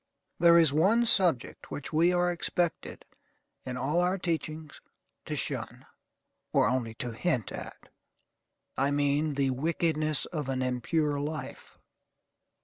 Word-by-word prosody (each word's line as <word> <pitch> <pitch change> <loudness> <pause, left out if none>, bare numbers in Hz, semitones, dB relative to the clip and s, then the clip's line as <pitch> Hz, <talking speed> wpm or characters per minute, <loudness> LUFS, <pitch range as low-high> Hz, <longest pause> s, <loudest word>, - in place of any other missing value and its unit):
There 170 0 +7
is 160 -4 +5
one 205 +10 +4
subject 175 - +1
which 145 +2 -6
we 165 +3 +4
are 175 0 +2
expected, 175 0 -2 0.6
in 125 0 -4
all 145 +7 0
our 180 +2 +1
teachings, 160 -4 -4 0.4
to - - -3
shun, - - -4 0.7
or - - +3
only 125 -3 -1
to 120 +1 -4
hint 120 - -1
at: - - -9 0.9
I 135 +1 +1
mean 145 +1 +1
the 135 -1 +1
wickedness 155 +1 0
of 150 -6 -4
an 130 -1 -1
impure 145 +4 0
life. 150 0 -6
155 Hz, 130 wpm, -29 LUFS, 135-170 Hz, 0.9 s, There